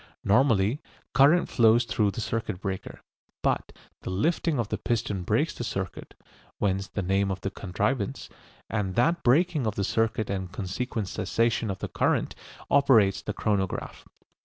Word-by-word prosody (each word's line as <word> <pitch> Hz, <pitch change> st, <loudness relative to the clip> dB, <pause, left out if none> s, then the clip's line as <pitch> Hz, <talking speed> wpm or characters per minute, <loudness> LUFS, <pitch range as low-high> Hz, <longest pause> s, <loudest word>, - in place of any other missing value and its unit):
Normally, 110 Hz, +2 st, +3 dB, 0.3 s
current 145 Hz, +7 st, +5 dB
flows 115 Hz, 0 st, +4 dB
through 105 Hz, -2 st, +1 dB
the 100 Hz, +4 st, -5 dB
circuit 110 Hz, -5 st, -3 dB
breaker, 95 Hz, -2 st, -5 dB, 0.4 s
but -, -, 0 dB, 0.3 s
the -, -, -6 dB
lifting 155 Hz, -, 0 dB
of 115 Hz, -3 st, -1 dB
the -, -, -2 dB
piston 110 Hz, -5 st, -1 dB
breaks 90 Hz, -, +1 dB
the -, -, -5 dB
circuit -, -, -5 dB, 0.4 s
(whence 95 Hz, -1 st, 0 dB
the 100 Hz, -, -4 dB
name 95 Hz, +2 st, +1 dB
of 95 Hz, 0 st, -3 dB
the 100 Hz, -, -3 dB
contrivance), 100 Hz, +4 st, -2 dB, 0.4 s
and 100 Hz, -3 st, -2 dB
that 165 Hz, +8 st, +2 dB
breaking 150 Hz, 0 st, +3 dB
of 105 Hz, -, -2 dB
the 100 Hz, -, -1 dB
circuit 110 Hz, +1 st, 0 dB
and 95 Hz, -2 st, -3 dB
consequent 105 Hz, +3 st, -3 dB
cessation 115 Hz, +4 st, 0 dB
of 95 Hz, -, -3 dB
the -, -, -4 dB
current -, -, 0 dB, 0.4 s
operates 115 Hz, -9 st, +4 dB
the 105 Hz, -, -4 dB
chronograph. 100 Hz, -3 st, -2 dB
105 Hz, 155 wpm, -27 LUFS, 95-120 Hz, 0.4 s, current